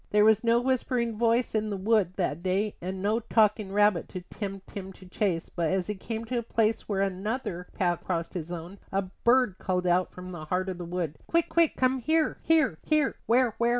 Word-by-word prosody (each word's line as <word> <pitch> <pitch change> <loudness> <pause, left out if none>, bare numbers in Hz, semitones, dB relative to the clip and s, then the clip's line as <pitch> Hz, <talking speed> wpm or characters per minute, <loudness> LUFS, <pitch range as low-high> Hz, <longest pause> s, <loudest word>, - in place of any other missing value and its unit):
There 210 0 +4
was 220 0 +5
no 230 0 +4
whispering 245 -2 0
voice 230 +2 +2
in 215 -1 0
the 200 - -2
wood 200 -2 +2
that 170 -4 -1
day 195 +3 0
and 185 +2 -4
no 215 +3 +2
talking 215 -3 +2
rabbit 205 -3 +3
to 185 - -6
tempt 195 +1 -7
him 190 -1 -6
to 185 - -15
a - - -14
chase; 180 -3 -1
but 170 -2 +1
as 190 -1 0
he 210 - -2
came 220 +3 -5
to 245 +1 -1
a - - -2
place 225 -1 0
where 195 -2 0
another 195 -1 -2
path 175 -2 0
crossed 170 -2 -2
his 175 -2 -5
own, 175 +3 -7
a 195 +1 +1
bird 235 +2 +2
called 180 -1 -1
out 180 +1 +2
from 180 0 -9
the 165 -3 -7
heart 185 +4 -1
of 180 -1 -5
the 175 - -5
wood: 170 -3 -3
"Quick, 335 -1 +1
quick, 335 -2 +3
come 260 0 +2
here, 315 +5 +1
here, 315 - +2
here 305 -3 +1
" - - -37
"Where, 240 -1 +3
where?" 235 0 +3
200 Hz, 225 wpm, -28 LUFS, 180-230 Hz, -, was